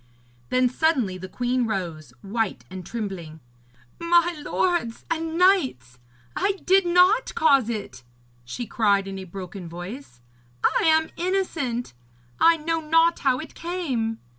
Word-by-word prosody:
Then 255 0 +3
suddenly 250 - 0
the 185 +1 -8
queen 245 +1 -1
rose, 170 - -4
white 220 +1 -2
and 185 -1 -7
trembling. 185 -7 -6 0.6
'My 345 +1 +3
lords 345 -13 -1
and 325 0 -2
knights, 260 - +2 0.4
I 400 - +1
did 380 0 +4
not 365 +7 +4
cause 275 -7 +4
it!' 210 - -5 0.4
she 125 - -6
cried 200 -4 +1
in 195 0 -6
a 190 - -7
broken 185 -1 -8
voice. 175 - -9 0.4
'I - - +2
am 320 0 +4
innocent! 335 - -2 0.5
I 335 0 +6
know 325 +1 -1
not 330 +2 +3
how 260 -2 +2
it 310 - -8
came!' 275 -11 -3
250 Hz, 135 wpm, -24 LUFS, -, 0.6 s, I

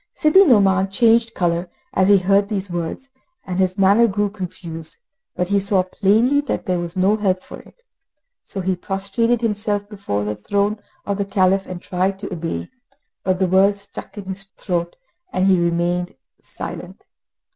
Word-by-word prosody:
Sidi 310 +6 +6
Nouman 195 - +4
changed 230 +2 +3
colour 175 0 0 0.2
as 190 -3 +3
he 200 - +7
heard 195 +2 +2
these 200 -3 -3
words, 175 +10 -4 0.4
and 185 -1 -3
his 185 0 +1
manner 200 +4 +5
grew 205 -1 -1
confused; 170 -5 -8 0.4
but 180 0 -1
he 200 0 +3
saw 195 -1 +2
plainly 220 +9 +2
that 290 - -3
there 180 -1 0
was 175 +1 -5
no 190 +3 +3
help 190 -3 0
for - - -10
it. 485 - -19 0.6
So 195 - -6
he 185 0 0
prostrated 200 +6 -1
himself 210 -2 -1
before 195 - -3
the 105 0 -2
throne 205 - -1 0.3
of 200 0 -2
the 200 - 0
Caliph 190 0 +2
and 180 -1 -6
tried 185 +2 -1
to 200 0 -6
obey, 165 0 -4 0.5
but 185 -1 0
the 190 - +2
words 195 +2 +3
stuck 200 - -10
in 200 - -6
his 190 +1 -6
throat, 175 -3 -2 0.4
and 185 - +1
he 190 -2 +4
remained 175 0 0 0.2
silent. - - -8
195 Hz, 170 wpm, -20 LUFS, 180-205 Hz, 0.6 s, he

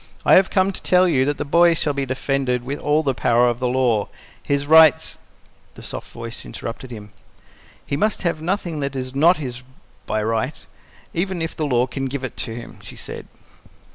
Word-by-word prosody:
I - - +5
have 190 0 +6
come 190 0 +2
to - - -9
tell 180 0 +4
you 135 -6 +2
that 145 +1 -1
the 145 - -3
boy 170 +3 +4
shall 150 -2 -1
be 140 -1 -2
defended 130 -1 -1
with 140 +3 -4
all 150 +2 +1
the 135 -3 +1
power 120 0 +3
of 120 -1 -1
the 125 - 0
law. 120 -5 +1 0.3
His 140 0 -1
rights 160 0 +5 0.3
" - - -34
The - - -12
soft - - -7
voice 115 0 -8
interrupted 120 +3 -7
him. 105 -3 -10 0.7
"He - - -2
must 210 +8 0
have 165 -3 -1
nothing 175 -2 -2
that 140 -1 -3
is 130 -1 -4
NOT 165 +6 +4
his 125 -4 -6 0.5
by 110 0 -1
right, 110 0 -2 0.5
even 185 +1 -2
if 165 0 -3
the 155 - -2
law 125 -2 +2
can 135 +1 -4
give 135 0 -4
it 130 - -5
to 115 - -4
him," 120 0 -10
she - - -9
said. - - -8
140 Hz, 205 wpm, -21 LUFS, 125-160 Hz, 0.7 s, have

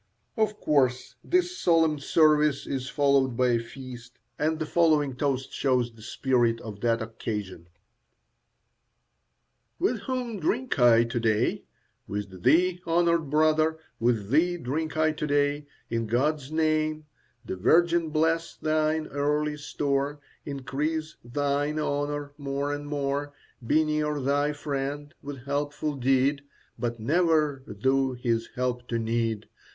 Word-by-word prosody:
Of 215 -1 0
course 130 -4 +1
this 360 0 +1
solemn 160 -3 +3
service 150 -1 +3
is 135 -1 -3
followed 140 -4 +2
by 125 -1 +3
a 120 -1 +3
feast, 125 0 -10 0.2
and 155 +1 +1
the 160 - -2
following 150 -5 +2
toast 135 -1 -1
shows 125 -4 +1
the 115 - -16
spirit 120 -1 +1
of 105 -2 -8
that 115 -1 +1
occasion: 105 -6 -5 2.1
With 235 -2 0
whom 245 -3 -3
drink 240 - -1
I 120 -2 +6
to 120 +1 -2
day? 110 -2 +1 0.4
With 100 -3 -5
thee, 180 - +3
honoured 170 -2 +2
brother, 155 +1 +3 0.2
with 115 -3 0
thee 175 +5 +3
drink 155 +2 -3
I 155 0 +3
to 150 0 -4
day 145 0 +1 0.2
In 115 -1 -1
God's 135 +4 0
name. 155 -1 0 0.4
The 100 - -4
Virgin 170 - +3
bless 165 +2 0
thine 155 0 0
earthly 150 +1 0
store; 145 0 -2 0.3
Increase 150 +3 -3
thine 145 +4 -1
honour 145 -1 -2
more 140 +1 -2
and 145 0 -5
more; 145 0 -2 0.3
Be 155 +7 +3
near 150 -1 0
thy 145 +2 +1
friend 145 +1 -4
with 140 -3 -8
helpful 145 +1 -2
deed, 135 +2 +2 0.4
But 120 -1 -2
never 155 +1 +2
thou 130 +5 +1
his 115 -2 -1
help 125 -1 -2
to 115 - -1
need. 115 -1 -1
145 Hz, 130 wpm, -27 LUFS, 125-155 Hz, 2.1 s, I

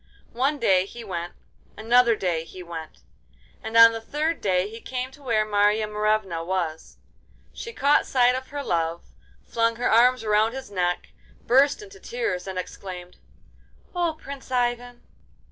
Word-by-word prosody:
One 275 +5 +1
day 190 -7 +3
he 235 +3 -9
went, 175 -4 -5 0.4
another 235 +2 +4
day 175 -5 -1
he 180 +2 -10
went, 165 -2 -9 0.6
and 225 -1 -2
on 230 0 +10
the 225 0 -5
third 305 +7 -2
day 185 -1 +1
he 225 +2 -10
came 255 0 -4
to 290 - -17
where 225 -5 +1
Marya 210 +1 +2
Morevna 210 -5 0
was. 170 -3 -3 0.6
She 465 - -7
caught 290 -9 +2
sight 250 -1 +4
of 260 +1 -4
her 285 0 -5
love, 165 -4 -1 0.4
flung 230 0 +1
her 245 +2 0
arms 245 +1 +5
around 215 +1 +2
his 265 -5 -8
neck, 180 -2 -1 0.4
burst 280 - +4
into 400 -1 -13
tears, 450 - -3
and 190 -1 -5
exclaimed: 180 -1 -7 0.8
'Oh, 340 -3 0
Prince 275 -2 -9
Ivan! 245 -1 -1
225 Hz, 155 wpm, -25 LUFS, 185-255 Hz, 0.8 s, on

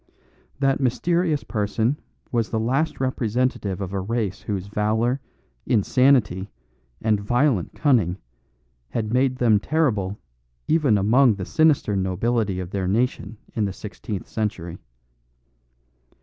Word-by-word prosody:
That 135 -1 +2
mysterious 160 +5 +1
person 110 +5 -1 0.3
was 115 -3 0
the 110 - -1
last 135 +8 0
representative 125 -6 -1
of 95 0 -4
a 100 - -1
race 105 -1 -2
whose 100 -3 -3
valour, 110 +5 0 0.5
insanity, 110 -4 +3 0.5
and 110 -2 +2
violent 120 - +1
cunning 110 - +2 0.7
had 110 -1 -2
made 130 0 +2
them 115 -5 +3
terrible 105 -9 0 0.5
even 150 -9 +3
among 115 +4 +4
the 95 -2 -5
sinister 155 - +2
nobility 95 +2 0
of 90 -1 -6
their 95 -2 -2
nation 115 +2 -1 0.2
in 110 - 0
the 100 - -3
sixteenth 105 0 -6
century. 95 -6 -3
110 Hz, 120 wpm, -23 LUFS, 100-130 Hz, 0.7 s, among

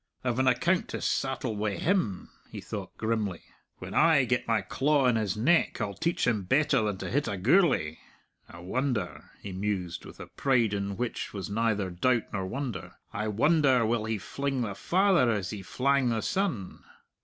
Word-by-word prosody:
"I've 125 -1 -1
an 130 - +2
account 130 +9 +2
to - - -5
sattle 135 -4 -1
wi' 105 -1 -1
him!" 165 - 0 0.2
he - - -7
thought - - -7
grimly. 110 -5 -2 0.3
"When - - -8
I 155 -5 +5
get 125 +1 0
my 115 -3 +2
claw 140 +7 +1
on 125 -2 +4
his 105 -3 -1
neck, 165 +11 +2
I'll 105 -3 -2
teach 170 - -1
him 115 -4 +1
better 135 +6 +2
than 105 -3 -1
to - - -5
hit 145 +3 +1
a 100 -2 -2
Gourlay! 125 - +3 0.5
I 85 - -11
wonder," 110 0 -2
he 100 - -6
mused, 95 -2 -3
with - - -12
a - - -7
pride 120 -6 +1
in 100 -1 -3
which 125 -1 -3
was 100 -1 -5
neither 105 -3 0
doubt 120 +6 0
nor 95 -2 -2
wonder 120 -3 -5 0.2
"I 105 +2 -2
wonder 130 +2 +3
will 110 -1 0
he 110 -1 -1
fling 135 +5 -3
the 105 -4 -2
father 180 - +3
as 100 -5 -1
he 105 -2 -6
flang 130 +5 +1
the 115 -2 0
son!" 185 - -2
115 Hz, 185 wpm, -28 LUFS, 100-135 Hz, 0.5 s, I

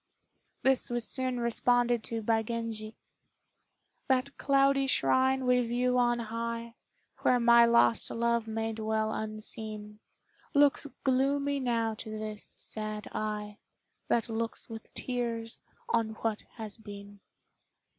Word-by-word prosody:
This 265 -1 +2
was 240 -1 -1
soon 255 -2 0
responded 240 0 +2
to 225 -1 -4
by 225 +1 +2
Genji: 225 -1 -4 1.1
"That 265 +1 +1
cloudy 275 0 +3
shrine 260 0 +2
we 250 0 +4
view 250 +1 +1
on 240 -1 +3
high, 230 0 -4 0.5
Where 250 - +3
my 235 0 +7
lost 235 0 +4
love 235 -1 0
may 225 0 -2
dwell 220 0 -1
unseen, 215 -1 -3 0.6
Looks 285 0 +4 0.2
gloomy 280 +2 +2
now 230 -3 0
to 215 0 -6
this 215 -1 -5
sad 215 -1 -4
eye 210 -1 -4 0.5
That 235 0 +1
looks 230 0 -3
with 225 -1 -9
tears 235 -2 -2 0.3
on 225 -2 +1
what 220 -2 -1
has 220 -3 -6
been." 205 -2 -11
230 Hz, 120 wpm, -30 LUFS, 220-250 Hz, 1.1 s, my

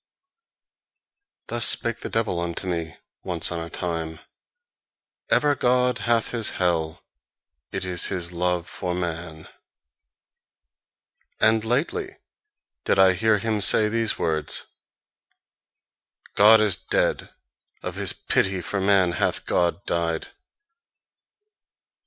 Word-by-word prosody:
Thus 120 0 -3
spake 115 -1 +3
the - - -6
devil 110 -6 -1
unto 85 +2 -4
me, 85 -3 -4 0.3
once 90 -3 -1
on 85 - -3
a 85 0 -6
time: 80 -3 -4 1.1
"Even 145 -1 +3
God 125 0 +2
hath 115 -1 0
his 115 -3 -1
hell: 80 -3 -1 0.7
it - - -3
is 90 -2 +2
his 90 -3 -3
love 90 0 -1
for 90 -2 -4
man." 85 -2 -5 1.9
And 110 0 +3
lately 165 - -2 0.7
did - - +1
I 95 -1 +6
hear 110 +3 +2
him 110 0 -2
say 105 +3 +5
these 115 0 0
words: 80 -2 -1 1.7
"God 110 +2 +7
is 105 -4 +2
dead: - - -1 0.5
of - - -4
his - - +2
pity 95 -1 0
for 95 +3 -3
man 95 -2 +3
hath 80 - -1
God 90 +3 0
died." 85 -1 -2
95 Hz, 110 wpm, -24 LUFS, 85-110 Hz, 1.9 s, God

